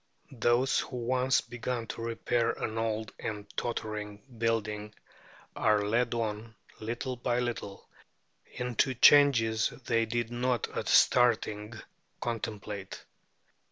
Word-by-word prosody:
Those 120 +2 +2
who 130 - -5
once 125 +2 +2
begin 120 0 -4
to - - -5
repair 115 0 0
an 110 +1 -3
old 110 -1 -2
and 105 -2 -4
tottering 105 -3 -4 0.2
building 105 -2 -1 0.6
are 105 -2 +3
led 120 +3 +1
on, 110 -1 -3 0.2
little 120 +4 -3
by 120 0 -1
little, 120 -5 -4 0.6
into 125 +1 0
changes 115 -5 +5 0.2
they 115 -1 +1
did 120 0 -2
not 120 -1 0
at - - -3
starting 110 -3 +3 0.4
contemplate. 105 -4 -5
115 Hz, 110 wpm, -30 LUFS, 110-120 Hz, 0.6 s, changes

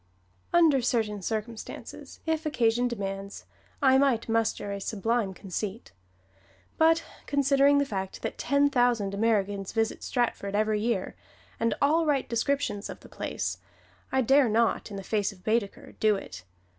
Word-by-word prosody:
Under 320 -6 +5
certain 220 -4 0
circumstances, 220 +3 -6
if 320 -1 0
occasion 240 -4 +2
demands, 195 -3 -5 0.4
I 265 -1 +6
might 270 -5 +2
muster 225 -2 0
a 200 0 -4
sublime 220 +1 -1
conceit; 200 +4 -5 0.9
but 325 +1 +4 0.2
considering 280 0 +4
the 285 - +3
fact 190 -6 -5
that - - -4
ten 280 +2 +2
thousand 240 -6 +2
Americans 200 -2 0
visit 225 -1 0
Stratford 225 -5 -1
every 215 0 +1
year, 220 -4 -1 0.4
and 230 0 +1
all 315 +3 +3
write 280 -3 +1
descriptions 235 -3 -1
of - - -8
the - - -14
place, - - -4 0.5
I 265 - +2
dare 270 +1 +4
not 225 +1 +1
in 200 - -6
the 195 - -6
face 205 +1 0
of 185 -2 -17
Baedeker 220 -2 -1
do 215 -1 +4
it. 95 - -8
225 Hz, 145 wpm, -28 LUFS, 205-270 Hz, 0.9 s, I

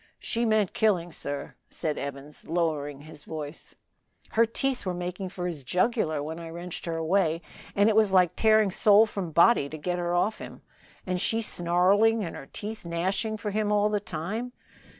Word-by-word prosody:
She 235 +1 -1
meant 215 -4 +2
killing. 180 -6 +1
Sir," 145 -2 -5 0.2
said 155 -2 -2
Evans, 140 +1 -8
lowering 155 -4 -1
his 150 -1 -12
voice, 155 0 -8 0.6
"her 230 +1 +4
teeth 265 +3 -1
were 185 -2 -2
making 180 +2 -4
for 180 -1 -5
his 165 -6 -4
jugular 175 - 0
when 160 +2 -5
I 165 -1 -7
wrenched 170 +1 -7
her 165 -1 -2
away, 165 0 +1 0.3
and 200 +1 +4
it 220 - +3
was 215 -2 +4
like 180 -3 +4
tearing 215 -2 +4
soul 210 +3 +6
from 195 -5 -4
body 170 -2 +5
to 155 - -7
get 175 +3 -2
her 175 0 -1
off 210 +5 +1
him, - - -10 0.4
and 185 -1 -1
she 225 - +1
snarling 200 +3 +3
and 165 - -6
her 135 - -10
teeth 215 +1 -6
gnashing 190 +6 -1
for 210 0 -4
him 210 0 0
all 210 0 +3
the 210 -1 0
time." 205 +7 -4
180 Hz, 185 wpm, -27 LUFS, 165-215 Hz, 0.6 s, soul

